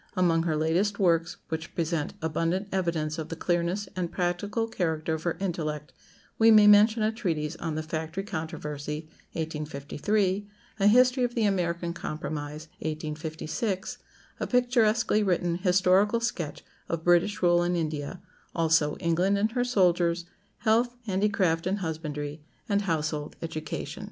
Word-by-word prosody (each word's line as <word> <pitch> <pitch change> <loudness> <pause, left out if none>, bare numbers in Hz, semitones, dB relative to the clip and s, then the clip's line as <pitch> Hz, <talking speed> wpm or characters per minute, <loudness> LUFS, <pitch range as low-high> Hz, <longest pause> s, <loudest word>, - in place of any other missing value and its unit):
Among 170 -3 +3
her 165 -2 0
latest 175 +7 +1
works, 170 -3 +2
which 160 +1 -5
present 165 -2 -1
abundant 165 +5 -1
evidence 165 -4 -1
of 155 - -5
the 165 - -4
clearness 175 +4 -1
and 180 -2 -2
practical 195 +5 -1
character 160 -6 -1
of 160 - -3
her 170 0 -2
intellect, 155 -5 -3 0.5
we 225 0 +7
may 215 -2 +8
mention 215 +2 +6
a 215 - +2
treatise 165 -8 -2
on 160 -2 -3
"The 155 - -2
Factory 160 +4 -4
Controversy," 155 -4 -5 0.3
1853; 160 +6 -1 0.3
a 200 - +4
"History 250 +3 +5
of 240 -1 -1
the 230 - +1
American 175 -4 0
Compromise," 155 -1 -5
1856; 155 +5 -3 0.4
a - - -2
picturesquely 240 -3 +3
written 175 -3 +1
historical 190 +4 +3
sketch 180 -10 -3 0.2
of 165 -1 -2
"British 175 +4 +3
Rule 175 0 +5
in 175 +1 +1
India;" 155 +2 -3 0.3
also, 160 -2 +3
"England 180 +3 +1
and 215 +2 +1
her 245 +1 +1
Soldiers;" 175 -7 +2 0.4
"Health, 235 +3 +3
Handicraft, 190 -4 +1
and 195 +2 0
Husbandry;" 155 -4 -4 0.3
and 205 -1 +2
"Household 155 -5 -2
Education." 155 -2 -5
175 Hz, 140 wpm, -27 LUFS, 160-200 Hz, 0.5 s, may